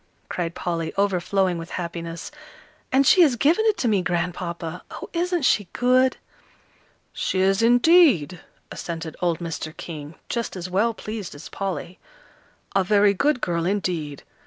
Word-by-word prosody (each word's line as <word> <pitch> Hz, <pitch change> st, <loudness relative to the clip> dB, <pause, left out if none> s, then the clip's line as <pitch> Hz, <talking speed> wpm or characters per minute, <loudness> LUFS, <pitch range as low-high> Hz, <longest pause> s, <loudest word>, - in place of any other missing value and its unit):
cried 170 Hz, -1 st, -3 dB
Polly, 165 Hz, -2 st, -2 dB
overflowing 190 Hz, -2 st, +1 dB
with 165 Hz, -, -8 dB
happiness; 170 Hz, -2 st, -5 dB, 0.6 s
"and 270 Hz, +1 st, +4 dB
she 365 Hz, -, +6 dB
has 290 Hz, -7 st, +5 dB
given 315 Hz, -, +3 dB
it 430 Hz, -, +2 dB
to 245 Hz, -, 0 dB
me, 205 Hz, -4 st, +2 dB
Grandpapa. 175 Hz, -1 st, -3 dB
Oh, -, -, -8 dB
isn't 350 Hz, -1 st, 0 dB
she 205 Hz, -6 st, +3 dB
good!" 255 Hz, +1 st, +3 dB, 1.0 s
"She 190 Hz, -, -1 dB
is, 195 Hz, +2 st, +3 dB
indeed," 240 Hz, -, +5 dB, 0.3 s
assented 165 Hz, -1 st, -6 dB
old 170 Hz, -2 st, +1 dB
Mr. 160 Hz, -2 st, -6 dB
King, 155 Hz, -2 st, -8 dB
just 235 Hz, -4 st, -3 dB
as 180 Hz, 0 st, -6 dB
well 220 Hz, +5 st, +1 dB
pleased 215 Hz, -7 st, -6 dB
as 145 Hz, -, -10 dB
Polly. 185 Hz, -2 st, -5 dB, 0.8 s
"A 195 Hz, -, +4 dB
very 205 Hz, +1 st, +4 dB
good 285 Hz, +5 st, +1 dB
girl, 170 Hz, -2 st, -1 dB
indeed. 175 Hz, -7 st, -2 dB
185 Hz, 145 wpm, -23 LUFS, 170-235 Hz, 1.0 s, she